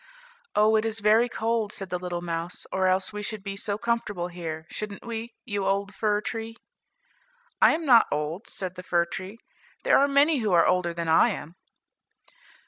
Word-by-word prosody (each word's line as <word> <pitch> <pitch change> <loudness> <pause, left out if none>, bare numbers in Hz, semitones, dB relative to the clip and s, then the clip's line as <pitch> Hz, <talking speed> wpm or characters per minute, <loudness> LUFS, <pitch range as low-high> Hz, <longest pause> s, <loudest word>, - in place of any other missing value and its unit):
"Oh, 215 +1 +4
it 215 - +1
is 225 0 -1
very 220 +4 +4
cold," 225 -2 -1
said 195 -2 -6
the 180 - -1
little 175 -1 -4
mouse, 170 +1 -4
"or 190 0 +1
else 185 +2 +1
we 210 - -4
should 210 -1 -5
be 195 0 -4
so 200 0 -2
comfortable 215 -6 -2
here, 165 -3 -6
shouldn't 210 0 -6
we, 230 0 -5
you 205 -4 -2
old 200 +1 0
fir 210 +1 0
tree?" 225 +1 -5 1.0
"I - - +7
am 325 0 -4
not 240 -5 +6
old," 155 +8 -3
said 185 -2 -5
the 180 - -8
fir 175 -1 +1
tree, 190 +4 -7 0.5
"there - - +5
are 280 - +4
many 285 +2 +4
who 215 -5 0
are 170 - +5
older 180 -1 +2
than 170 0 -4
I 160 - +5
am." 165 +4 -6
200 Hz, 190 wpm, -26 LUFS, 180-225 Hz, 1.0 s, I